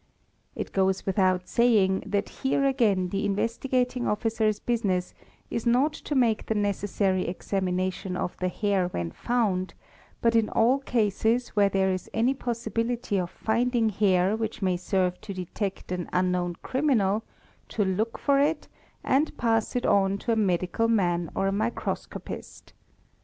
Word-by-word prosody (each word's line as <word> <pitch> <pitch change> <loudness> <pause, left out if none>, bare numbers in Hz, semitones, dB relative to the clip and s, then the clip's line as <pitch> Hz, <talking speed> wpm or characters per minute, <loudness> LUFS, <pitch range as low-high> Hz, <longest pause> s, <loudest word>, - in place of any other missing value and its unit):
It - - -5
goes 190 -1 +1
without 185 -2 +1
saying 210 -6 +3
that 205 0 0
here 275 +1 +1
again 210 -9 +2
the 195 +2 -2
Investigating 245 +4 0
Officer's 215 -1 0
business 200 -7 -1 0.4
is 230 +1 -2
not 260 +6 +3
to 300 - -5
make 230 -4 +2
the 220 - 0
necessary 200 -2 0
examination 185 0 -2
of 180 - -3
the 185 - -1
hair 195 0 0
when 85 - -4
found, 195 - -1 0.4
but 230 0 +2
in 225 -2 +3
all 245 +5 +3
cases 235 -1 +1
where 205 -2 +3
there 190 -1 +1
is 185 -1 -4
any 235 +4 +3
possibility 230 -3 -2
of 175 -1 -2
finding 230 +2 +1
hair 195 -1 +2
which 220 0 -3
may 185 -1 +2
serve 180 0 -1
to 200 - -7
detect 185 +1 -4
an 180 -2 -3
unknown 180 -1 0
criminal, 225 -7 +1 0.5
to 210 - 0
look 210 +5 -1
for 280 -1 +2
it 295 +2 +1 0.4
and 285 +4 +1
pass 225 -1 +1
it 245 - 0
on 195 -1 +3
to 230 - -2
a - - +3
medical 185 +1 +1
man 175 -7 +1
or 195 - 0
a - - +1
microscopist. 220 +4 -4
205 Hz, 150 wpm, -27 LUFS, 185-235 Hz, 0.5 s, saying